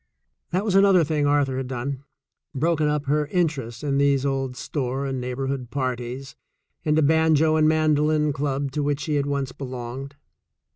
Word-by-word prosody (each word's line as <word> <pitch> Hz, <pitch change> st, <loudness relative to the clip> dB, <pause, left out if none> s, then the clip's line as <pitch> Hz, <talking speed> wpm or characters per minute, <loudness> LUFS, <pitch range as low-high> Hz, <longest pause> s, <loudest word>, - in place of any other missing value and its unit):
That 185 Hz, +4 st, -1 dB
was 205 Hz, -, 0 dB
another 195 Hz, -2 st, +6 dB
thing 150 Hz, -1 st, 0 dB
Arthur 145 Hz, -2 st, +2 dB
had 130 Hz, -1 st, -3 dB
done 130 Hz, +2 st, -4 dB, 0.3 s
— -, -, -39 dB
broken 155 Hz, +2 st, +1 dB
up 150 Hz, -1 st, 0 dB
her 150 Hz, +1 st, +1 dB
interest 150 Hz, -8 st, -1 dB
in 140 Hz, -1 st, 0 dB
these 140 Hz, -1 st, +2 dB
old 135 Hz, -2 st, -1 dB
store 135 Hz, -1 st, -3 dB
and 135 Hz, -2 st, -3 dB
neighborhood 125 Hz, 0 st, -3 dB
par 130 Hz, -2 st, -1 dB
ties 125 Hz, +3 st, -7 dB, 0.5 s
and 155 Hz, 0 st, +2 dB
a 155 Hz, -, +4 dB
banjo 160 Hz, 0 st, +4 dB
and 155 Hz, 0 st, +4 dB
mandolin 155 Hz, -1 st, +2 dB
club 140 Hz, 0 st, -2 dB
to 150 Hz, +2 st, -2 dB
which 145 Hz, 0 st, -1 dB
she 155 Hz, -, -2 dB
had 145 Hz, -1 st, +1 dB
once 140 Hz, -2 st, -2 dB
belonged. 130 Hz, +1 st, -7 dB
140 Hz, 180 wpm, -24 LUFS, 135-155 Hz, 0.5 s, another